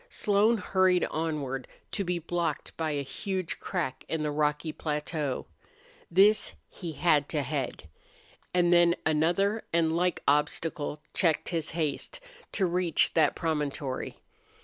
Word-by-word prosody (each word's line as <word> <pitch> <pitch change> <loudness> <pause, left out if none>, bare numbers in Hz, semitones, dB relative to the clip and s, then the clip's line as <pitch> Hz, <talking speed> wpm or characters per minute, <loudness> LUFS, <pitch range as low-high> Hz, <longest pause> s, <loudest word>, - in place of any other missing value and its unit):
Slone 210 +3 +3
hurried 185 -2 +3
onward, 145 -5 -2 0.2
to 200 - -1
be 180 -1 -1
blocked 170 -2 -2
by 160 -1 -1
a 145 -2 -1
huge 185 +5 -4
crack 155 -9 -3
in 160 -1 -1
the 150 - 0
rocky 150 +1 0
plateau. 150 -3 -3 0.6
This 200 +5 +4
he 170 -4 -7
had 150 -3 +2
to 150 -3 0
head. 135 - -3 0.6
And 175 -1 +3
then 175 0 +5
another 175 +8 +2
and 165 -1 +2
like 180 0 0
obstacle 150 +1 0
checked 165 -5 +1
his 165 -3 -1
haste 155 - -2 0.3
to 195 - +1
reach 175 -1 +2
that 160 -2 +3
promontory. 145 -4 -2
165 Hz, 130 wpm, -29 LUFS, 150-180 Hz, 0.6 s, then